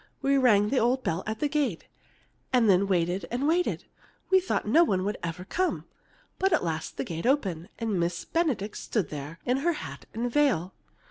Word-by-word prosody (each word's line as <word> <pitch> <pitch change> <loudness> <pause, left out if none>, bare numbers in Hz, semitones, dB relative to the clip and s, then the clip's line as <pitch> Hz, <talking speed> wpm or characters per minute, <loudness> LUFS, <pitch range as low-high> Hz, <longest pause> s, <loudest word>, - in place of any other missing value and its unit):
We 275 0 +3
rang 210 -5 +4
the 265 - +2
old 255 +3 +1
bell 165 +3 -1
at 220 0 -4
the 295 - +2
gate, 280 - -1 0.7
and 245 -3 +4
then 195 0 +4
waited 175 -1 0
and 255 +4 -1
waited. 345 +3 +1 0.5
I 380 - +8
thought 370 - -2
no 320 +11 +6
one 190 - +1
would 205 - -2
ever 170 +2 -5
come. 365 - -1 0.5
But 385 +1 +2
at 325 - +2
last 160 -2 -3
the - - -1
gate 165 +6 -4
opened, 195 - 0
and 220 -5 -1
Miss 170 0 -1
Benedict 285 - -1
stood 205 -9 -2
there 150 +2 -7
in 250 +1 +2
her 340 +5 +1
hat 300 - -8
and 235 +2 -2
veil. 240 - +2
220 Hz, 195 wpm, -27 LUFS, 180-280 Hz, 0.7 s, I